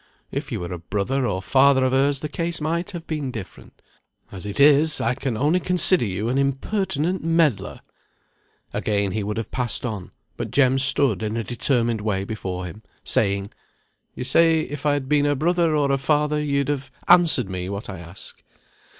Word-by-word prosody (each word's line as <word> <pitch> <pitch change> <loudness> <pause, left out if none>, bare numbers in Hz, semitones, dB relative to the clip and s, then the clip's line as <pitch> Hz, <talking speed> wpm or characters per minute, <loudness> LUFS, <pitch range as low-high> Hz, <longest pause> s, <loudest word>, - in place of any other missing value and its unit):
If - - -5
you - - -3
were 90 +1 -5
a 90 - -6
brother, 105 +9 -2
or 95 -3 -3
father 135 +2 +4
of 130 - +1
hers, 135 +1 +1
the 150 - -3
case 165 +2 -3
might 170 +5 -2
have 175 -4 -8
been 150 -4 -3
different. 110 -7 -10 0.5
As 95 0 -8
it 100 - -5
is, 150 +2 +5
I 115 - 0
can 125 -3 -4
only 150 +8 +2
consider 180 -4 +4
you 100 +2 -3
an 130 +3 0
impertinent 160 +4 -1
meddler." 165 -7 0 0.9
Again 100 -2 -1
he 110 - -2
would 105 +1 -4
have 115 -2 -5
passed 125 -1 -1
on, 105 -6 -5 0.3
but - - -4
Jem 135 -1 +3
stood 135 -6 +4
in 110 +1 -3
a 115 - -2
determined 120 0 +1
way 100 -2 -1
before 95 -3 -5
him, 90 +5 -9 0.2
saying, 100 -1 +1 0.6
"You - - -5
say 160 +5 +3
if 145 +1 -5
I 145 - +3
had 140 -2 -3
been 145 0 +2
her 145 0 +1
brother, 165 +2 +1
or 145 -2 +1
her 135 - +2
father, 150 +2 0
you'd 140 -1 -1
have 140 -2 -3 0.2
answered 170 - +5
me 90 -1 -5
what 100 +1 -5
I 95 -4 -7
ask. 85 +3 -7
135 Hz, 190 wpm, -22 LUFS, 105-150 Hz, 0.9 s, is